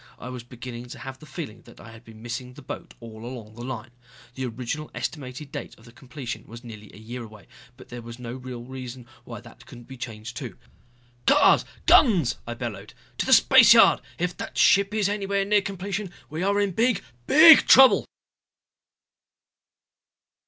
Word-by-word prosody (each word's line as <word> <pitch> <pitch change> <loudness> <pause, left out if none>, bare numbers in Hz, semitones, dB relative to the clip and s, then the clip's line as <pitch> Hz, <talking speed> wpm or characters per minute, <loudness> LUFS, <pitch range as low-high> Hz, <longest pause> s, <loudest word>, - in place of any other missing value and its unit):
I 125 - -9
was 125 -1 -7
beginning 120 0 -9
to - - -10
have 130 +1 -9
the 155 - -14
feeling 150 -12 -8
that 120 - -17
I 110 - -12
had 115 +1 -15
been 110 -1 -15
missing 125 +2 -6
the 145 - -13
boat - - -9
all 110 -1 -11
along 120 -3 -9
the 120 +2 -10
line. 120 -1 -7 0.4
The 130 0 -4
original 125 +6 -5
estimated 140 -1 -6
date - - -8
of 115 +1 -17
completion 125 0 -8
was 115 +2 -11
nearly 110 -3 -11
a - - -15
year 120 +3 -8
away. 105 -3 -14 0.3
But 130 - -15
there 120 0 -8
was 115 0 -10
no 120 -1 -7
real 125 -2 -8
reason 130 -1 -9 0.2
why - - -9
that - - -17
couldn't 120 -1 -13
be 130 - -11
changed, 115 -1 -8
too. - - -7 0.7
"Cars! - - +5 0.2
Guns!" 185 - +4
I 120 - -5
bellowed. 120 -3 -7 0.2
"To - - -1
the - - 0
spaceyard. - - +7 0.2
If 180 +1 -2
that - - -7
ship 200 0 +4
is 210 -3 +1
anywhere 200 -1 -1
near 205 0 +3
completion, 195 0 -5 0.2
we 155 +2 -4
are 200 +2 +1
in 200 -1 0
big, 230 +3 +1 0.2
big 315 +1 +8
trouble!" 265 0 +7
125 Hz, 180 wpm, -24 LUFS, 115-175 Hz, 0.7 s, big